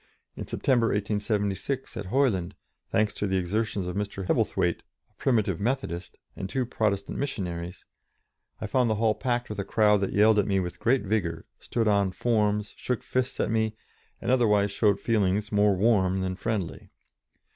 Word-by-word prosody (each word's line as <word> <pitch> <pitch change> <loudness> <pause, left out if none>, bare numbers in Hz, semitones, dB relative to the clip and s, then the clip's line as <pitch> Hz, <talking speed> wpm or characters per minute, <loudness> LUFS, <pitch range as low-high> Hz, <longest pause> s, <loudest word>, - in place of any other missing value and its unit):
In - - -6
September, 120 -4 +2
1876, 105 +5 -1
at 105 -4 -5
Hoyland, 100 -7 +1 0.3
thanks 105 -1 +1
to 105 - -2
the 95 0 +1
exertions 100 +2 -1
of 90 - -4
Mr. 100 -2 -3
Hebblethwaite, - - +1 0.3
a - - -36
Primitive 115 -7 +1
Methodist, 100 -6 -3 0.2
and 95 - -5
two 130 +2 -1
Protestant 105 -4 -1
missionaries, 90 -9 -4 0.7
I - - -4
found 120 +3 +2
the 110 - +1
hall 110 0 +2
packed 120 +2 -1
with 105 -1 -6
a - - 0
crowd 105 0 +3
that 100 - -1
yelled 105 +1 +5
at 105 - +1
me 100 -2 +2
with 90 -2 -4
great 125 +1 +2
vigour, 95 -5 -1
stood 115 -2 -1
on 100 -2 +3
forms, 105 -2 0
shook 125 -3 -3
fists 130 +1 -2
at - - 0
me, 110 -1 0 0.4
and - - -1
otherwise 105 -5 +3
showed 100 -1 +2
feelings 105 -1 +1
more 105 -1 +4
warm 95 -2 +2
than 95 0 -2
friendly. 105 -4 -3
105 Hz, 165 wpm, -27 LUFS, 95-115 Hz, 0.7 s, yelled